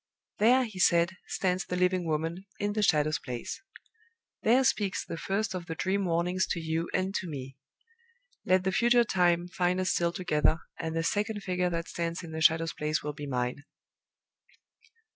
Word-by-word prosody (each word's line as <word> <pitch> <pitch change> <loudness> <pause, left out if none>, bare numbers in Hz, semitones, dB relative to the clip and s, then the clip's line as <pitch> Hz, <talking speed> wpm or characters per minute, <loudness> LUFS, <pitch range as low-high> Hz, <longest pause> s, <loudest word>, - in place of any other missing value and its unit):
"There," 250 +4 +5
he 215 -6 -7
said, 170 -1 +4 0.2
"stands 185 0 0
the 180 - -4
living 180 -1 +1
Woman, 165 +5 -2
in 205 0 -1
the 215 - 0
Shadow's 155 -5 +2
place! 120 -2 -6 0.8
There 245 +4 +4
speaks 205 -6 0
the - - -5
first 195 +4 -2
of 180 -2 -5
the 165 - -4
dream 195 +3 0
warnings 180 +2 +1
to 170 - -2
you 160 +1 -2
and 190 +1 -1
to 190 - -2
me! 135 -4 -7 0.9
Let 185 0 +3
the 190 - +1
future 240 +4 +4
time 175 -4 +2
find 180 0 0
us 185 -1 +1
still 170 -1 +1
together, 165 -4 +1 0.2
and 160 -1 -3
the 165 - 0
second 205 +3 -1
figure 180 -1 0
that 170 -1 -3
stands 170 +1 -3
in 165 - -8
the 160 0 -4
Shadow's 165 +1 +4
place 150 +1 -1
will 150 0 -3
be 145 0 -7
Mine." 125 -1 -1
175 Hz, 180 wpm, -29 LUFS, 160-190 Hz, 0.9 s, There